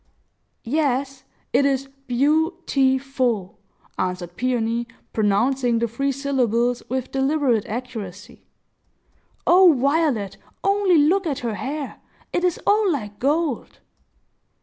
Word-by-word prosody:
"Yes; 275 0 -1 0.3
it - - +4
is 275 -1 +1 0.2
beau 305 +7 +2
ti 265 -1 +3
ful," 240 -7 -2 0.4
answered 180 -1 -3
Peony, 235 -2 -1 0.3
pronouncing 230 +4 +2
the 235 +1 +1
three 275 +5 -1
syllables 245 -3 0
with 260 0 -3
deliberate 270 -5 +1
accuracy. 220 -4 -7 1.0
"O 360 0 +7
Violet, 275 -6 +1 0.3
only 395 -3 +3
look 340 +5 +3
at 270 -5 -3
her 230 - -1
hair! 280 +6 -5 0.3
It 350 - 0
is 360 -2 +1
all 415 -1 +3
like 210 -8 -4
gold!" 295 0 -1
265 Hz, 110 wpm, -22 LUFS, 230-295 Hz, 1.0 s, O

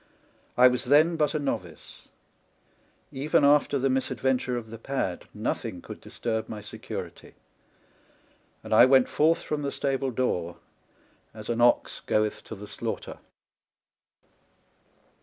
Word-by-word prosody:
I 125 +1 +8
was 125 -1 0
then 155 +6 +4
but 155 -1 0
a - - +1
novice; 140 -2 -6 1.0
even 140 +2 +2
after 145 0 +4
the 135 0 +1
mis 130 0 0
adventure 130 -1 0
of 110 -2 -7
the 115 - -8
pad 115 -8 -3
nothing - - -3
could - - -10
disturb 110 -2 -4
my 110 - -6
security, - - -8 1.3
and - - -4
I 120 - +8
went 130 -1 +5
forth 160 +2 +2
from 150 -1 -3
the 140 -1 -2
stable 135 -1 -1
door 90 -9 -2 0.8
as 110 0 -9
an 120 0 0
ox 120 0 +3
goeth 105 0 -1
to 110 - -7
the 105 +1 -10
slaughter. - - -5
130 Hz, 135 wpm, -27 LUFS, 115-140 Hz, 1.3 s, I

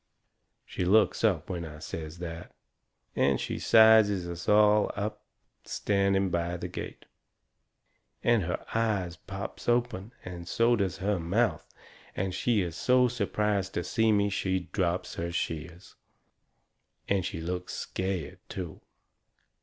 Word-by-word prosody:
She - - -4
looks 105 +6 +3
up 95 -9 +2
when 90 -2 -4
I 80 -2 -8
says 80 +1 -7
that, 85 -1 -7 0.6
and 70 -2 +2
she - - -3
sizes 110 -4 +6
us 85 0 -5
all 105 0 +5
up 105 +2 -3 0.4
standing 100 -1 +1
by 85 0 -1
the - - -5
gate, - - -7 1.2
and 120 -2 +4
her 85 - -3
eyes 105 -6 0
pops 100 +5 -6
open, 120 -4 0
and 90 -2 -7
so 115 +4 +3
does 100 -5 -1
her 100 0 0
mouth, 100 +8 0 0.5
and 95 0 -2
she 115 0 +1
is 85 -3 -3
so 125 +5 +4
surprised 105 -4 -1
to 85 - 0
see 110 +3 +2
me 100 -1 +2
she 95 -1 0
drops 90 -2 -1
her 85 +1 -3
shears. 85 +2 -4 1.1
And 100 -2 +1
she 80 - -4
looks 90 +2 -4
scared, 95 -4 -3
too. 90 -4 -6
95 Hz, 135 wpm, -29 LUFS, 85-105 Hz, 1.2 s, sizes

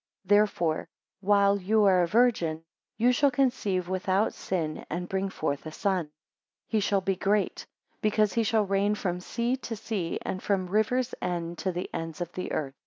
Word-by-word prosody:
10 205 - +6
Therefore 175 -7 +1 0.3
while 200 0 +4
you 210 +3 +2
are 190 -2 +5
a 175 - +2
Virgin, 175 -7 +2 0.3
you 240 +2 +4
shall 275 +3 +4
conceive 245 -9 0
without 190 +3 +1
sin, 160 -5 -3
and 175 +2 -3
bring 195 +1 -1
forth 145 -6 -2
a - - -6
son. 190 0 0
11 150 - -25 0.6
He 220 - +2
shall 200 -1 +1
be 195 0 0
great, 200 +2 0 0.3
because 215 -1 +2
he 230 - +2
shall 220 -2 +2
reign 200 +2 +1
from 180 -4 -2
sea 235 +6 -1
to 240 -3 -5
sea, 205 -6 -3
and 185 - -3
from 195 -2 0
the 180 - -11
rivers 240 +4 +1
even 175 -1 -2
to 190 - -1
the 180 +1 -4
ends 165 0 -5
of 175 -1 -4
the 180 - -5
earth? 135 -3 -2
195 Hz, 190 wpm, -28 LUFS, 180-215 Hz, 0.6 s, 10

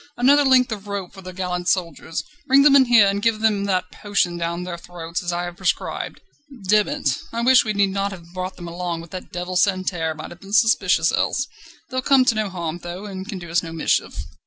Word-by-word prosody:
another 280 +4 +5
length 255 -3 +4
of 210 -1 -6
rope 200 -3 -5
for 195 - -11
the 185 0 -8
gallant 180 -1 -3
soldiers. 165 -3 -2 0.2
Bring 275 +1 +6
them 285 -1 +6
in 270 -2 +7
here, 235 -4 +6
then 200 0 +1
give 220 +1 +1
them 210 -2 +1
that 185 -2 -1
potion 195 -4 -1
down 170 +1 -3
their 180 -1 -5
throats, 170 -1 -6
as 175 - -3
I 175 0 -2
have 175 0 -6
prescribed. - - -2 0.5
Demm 210 +1 +4
it! 135 -2 -1
I 235 0 -2
wish 255 0 +6
we 215 - -2
need 200 -1 +2
not 200 +1 -1
have 170 -2 -11
brought 185 0 -4
them 175 -1 -9
along, 170 -1 -4
but 170 - -13
that 185 - -8
devil 180 +1 -4
Santerre 180 -4 +1
might - - -8
have 175 - -12
been 195 +1 -11
suspicious 195 -7 +3
else. 270 - 0 0.5
They'll 255 0 -1
come 270 -1 +4
to 255 - +4
no 215 -2 -1
harm, 170 -2 -4
though, 175 +3 -7
and 195 0 -7
can 200 - -4
do 175 -2 -9
us 170 - +3
no 165 - -7
mischief." 160 - -1
185 Hz, 230 wpm, -22 LUFS, 175-215 Hz, 0.5 s, in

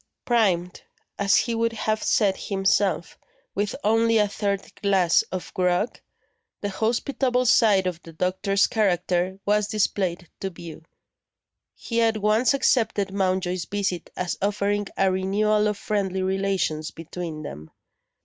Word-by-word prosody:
Primed, 185 -7 +1 0.4
as 200 -1 +3
he 235 - +1
would 230 0 0
have 215 -1 -1
said 200 -3 +2
himself, 195 -2 0 0.3
with 205 +1 -2
only 225 +1 +3
a 210 -1 +3
third 200 -1 -3
glass 190 -4 +3
of 185 -1 -5
grog, 180 +4 0 0.6
the 205 - -2
hospitable 250 +4 0
side 210 -5 +4
of 175 -2 -3
the 165 - -12
doctor's 185 +4 +1
character 185 -3 0
was 210 0 +2
displayed 195 -4 -1
to 195 - -3
view. 170 -3 -10 0.9
He 230 -1 -2
at 225 -1 +2
once 215 +6 +2
accepted 220 -7 +1
Mountjoy's 185 -2 0
visit 195 -4 -3
as 180 -1 -3
offering 205 0 0
a 195 -1 +3
renewal 210 +3 +1
of 210 -1 -1
friendly 190 -3 -1
relations 190 -5 -1
between 165 -1 -7
them. 80 - -8
195 Hz, 130 wpm, -24 LUFS, 185-215 Hz, 0.9 s, side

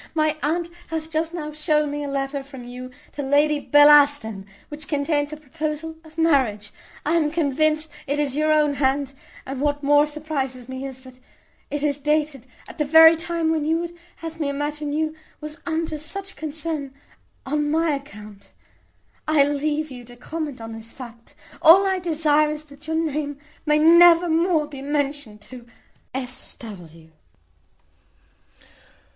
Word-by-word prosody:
My 310 -1 +2
aunt 335 +4 0 0.2
hath 320 -1 -5
just 320 +1 -1
now 310 -3 -5
shown 300 -1 +1
me 290 0 -3
a - - -4
letter 275 0 -2
from 270 -2 -11
you 250 +1 -8 0.2
to 290 - -5
Lady 290 +2 +2
Bellaston, 290 -9 +5 0.2
which 300 0 -7
contains 290 0 0
a 305 - -6
proposal 310 +2 -5
of 315 0 -17
marriage. 255 -11 +1 0.3
I 305 - +1
am 320 -3 +2
convinced 310 0 0 0.2
it 285 +2 -1
is 280 -3 0
your 310 +1 +2
own 300 -1 +3
hand; 275 0 0 0.3
and 270 0 -5
what 290 0 0
more 290 +1 +5
surprizes 280 -5 -4
me 260 +1 -6
is, 260 -1 -10
that 255 -1 -14 0.5
it 290 0 -3
is 290 -1 0
dated 300 -3 -1 0.2
at - - -12
the - - +3
very 320 +2 +8
time 330 0 -1
when 315 -2 0
you 320 +2 +1
would 345 0 -5 0.2
have 325 0 -8
me 295 -3 -1
imagine 295 +1 -3
you 310 +1 -1 0.3
was 305 +1 -8
under 320 -2 -2
such 390 +6 -5
concern 305 -3 -5 0.5
on 295 +2 0
my 325 +1 +2
account. 210 -8 -8 0.7
I 310 -2 +5
leave 295 +1 -1
you 245 -1 -9
to 245 +1 -14
comment 295 +1 -5
on 225 0 -7
this 225 0 -9
fact. 235 -3 -12 0.3
All 355 +5 +8
I 380 -1 +1
desire 305 -3 +2
is, 300 0 -4
that 290 +1 -13
your 320 - -1
name 300 -3 -2 0.3
may 300 0 +4
never 340 +2 +7
more 330 -1 +2
be 285 -2 -9
mentioned 285 -6 -3
to 245 +2 -12 0.4
"S. 255 -1 -4
W." 165 -7 -12
295 Hz, 165 wpm, -23 LUFS, 275-315 Hz, 0.7 s, very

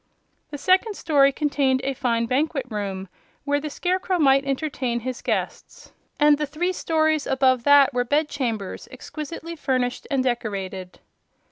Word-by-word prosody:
The 295 - -6
second 375 +8 +2
story 280 -6 +3
contained 275 -2 +1
a 275 +1 -1
fine 235 -3 0
banquet 270 +2 0
room, 195 -2 -4 0.4
where 285 0 +1
the 305 +1 -5
Scarecrow 365 +4 -1
might 275 -3 +4
entertain 265 -4 -2
his 255 +1 -5
guests, - - -4 0.3
and 295 0 +5
the 300 - -1
three 345 +6 -2
stories 315 -3 0
above 260 -2 +2
that 285 -1 +6
were 245 0 +1
bed 290 +5 +1
chambers 230 -9 -4
exquisitely 310 +5 -7
furnished 255 -4 -2
and 270 -2 +1
decorated. 195 -7 -4
275 Hz, 145 wpm, -23 LUFS, 245-305 Hz, 0.4 s, that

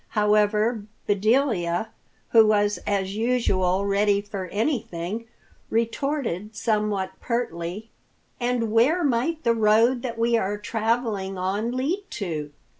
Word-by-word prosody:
However, 210 +1 +2 0.2
Bedelia, 205 -3 +1 0.4
who 225 -2 +7
was 205 -1 +2
as 195 -1 -1
usual 200 -5 +1
ready 200 0 +2
for 200 -2 -5
anything, 210 - -2 0.4
retorted 230 - -2
somewhat 210 -3 0
pertly, 210 -3 -3 0.5
"And 240 -3 0
where 270 +11 +3
might 290 +5 0
the 235 - +3
road 225 +3 +3
that 235 -2 -4
we 235 +1 +2
are 205 -1 -1
traveling 215 -2 -1
on 200 +6 -1
lead 345 +10 -1
to?" 155 -7 -4
215 Hz, 115 wpm, -24 LUFS, 200-235 Hz, 0.5 s, who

